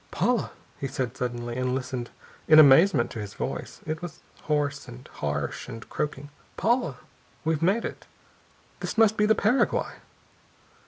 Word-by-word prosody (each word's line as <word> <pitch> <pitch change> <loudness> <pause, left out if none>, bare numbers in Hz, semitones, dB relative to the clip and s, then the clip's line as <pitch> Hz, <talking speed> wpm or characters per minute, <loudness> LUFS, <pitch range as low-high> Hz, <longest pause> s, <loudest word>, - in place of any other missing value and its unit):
"Paula," 245 -4 +1 0.3
he 135 - -2
said 130 -3 -3
suddenly, 120 -1 -3
and 130 0 0
listened 130 -2 -4 0.4
in 155 - +7
amazement 155 -1 +7
to 115 - -6
his 105 -1 -7
voice. - - -5
It 155 0 -3
was 175 -5 -8 0.2
hoarse 145 -2 -1
and 125 +1 -11
harsh 75 -1 -4
and 115 +1 -8
croaking. 145 -1 -3 0.3
"Paula, 235 - +1 0.5
we've 160 -1 +1
made 195 +7 +2
it. - - -7 0.7
This - - -4
must 220 -1 +5
be 210 0 +2
the 220 - +5
Paraguay." 225 +6 +2
145 Hz, 150 wpm, -26 LUFS, 125-180 Hz, 0.7 s, in